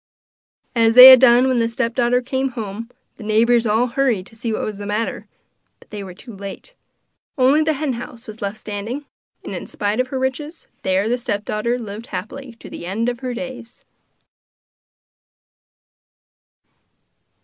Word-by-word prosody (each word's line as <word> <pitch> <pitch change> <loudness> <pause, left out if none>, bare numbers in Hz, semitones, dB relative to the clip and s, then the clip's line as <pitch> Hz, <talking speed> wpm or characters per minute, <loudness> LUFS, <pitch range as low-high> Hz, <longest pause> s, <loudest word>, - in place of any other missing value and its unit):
As 225 -1 +3
they 250 +1 +13
had 260 - +9
done 250 0 +5
when 255 -2 +1
the 230 - +2
stepdaughter 240 +1 0
came 265 +1 -2
home, 220 +1 -6 0.3
the 225 - -10
neighbours 230 +2 +2
all 220 +3 +2
hurried 245 -6 0
to 225 - -16
see 230 0 -4
what 215 - -2
was 210 -2 -5
the 205 - -6
matter; 215 +2 -3 0.5
but - - -22
they 205 -1 -6
were 185 -2 -10
too 235 +2 -12
late. 200 - -9 0.6
Only 270 +4 +4
the 315 0 +1
hen 290 -2 -2
house 240 0 -9
was 215 0 -11
left 200 +1 -3
standing; 220 +8 -6 0.4
and, - - -7
in - - -6
spite 205 +2 -2
of 255 - +1
her 265 - -4
riches, 290 +5 -4 0.2
there 190 +2 0
the 245 +2 0
stepdaughter 215 0 -2
lived 220 -1 -8
happily 255 +6 -7
to 230 - -14
the 170 - -8
end 225 +6 -1
of 240 -1 -5
her 255 -2 -4
days. 245 -2 -8
235 Hz, 165 wpm, -20 LUFS, 215-255 Hz, 0.6 s, they